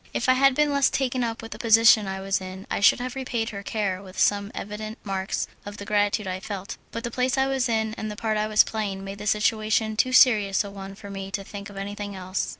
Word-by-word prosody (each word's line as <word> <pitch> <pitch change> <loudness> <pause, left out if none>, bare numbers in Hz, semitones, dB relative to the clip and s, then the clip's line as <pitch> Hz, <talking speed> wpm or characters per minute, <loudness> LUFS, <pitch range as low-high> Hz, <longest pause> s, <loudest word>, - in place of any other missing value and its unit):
If - - 0
I 255 - +6
had 270 0 +4
been 300 0 +2
less 280 -1 +4
taken 255 -2 -1
up 230 -1 -3
with 225 - -9
the - - -8
position 225 -2 +6
I 190 0 -4
was 195 0 0
in 185 +1 -8
I - - 0
should 205 - +5
have 250 0 -4
repaid 240 -4 -2
her 200 -2 -6
care 200 -3 -2
with 185 -1 -13
some 200 0 +2
evident 215 +2 -6
marks 195 -1 -2 0.2
of 205 0 -8
the 200 - -7
gratitude 205 0 +1
I 185 0 -3
felt, 195 0 -6
but 230 - -6
the 235 - -3
place 255 +2 0
I 265 - +3
was 270 -2 0
in 220 -1 0
and 215 - -3
the 210 - -6
part 220 0 -1
I 215 0 0
was 215 0 +6
playing 200 -3 -4
made 195 +1 -7
the 210 - -5
situation 215 +1 +1
too 255 +4 +2
serious 215 -7 +5
a 200 - -8
one 195 0 -8
for 200 0 -10
me 195 -1 -6
to 195 0 -4
think 200 +1 -8
of 200 - -11
anything 205 0 -5
else. 185 0 -3
210 Hz, 255 wpm, -25 LUFS, 195-230 Hz, 0.2 s, I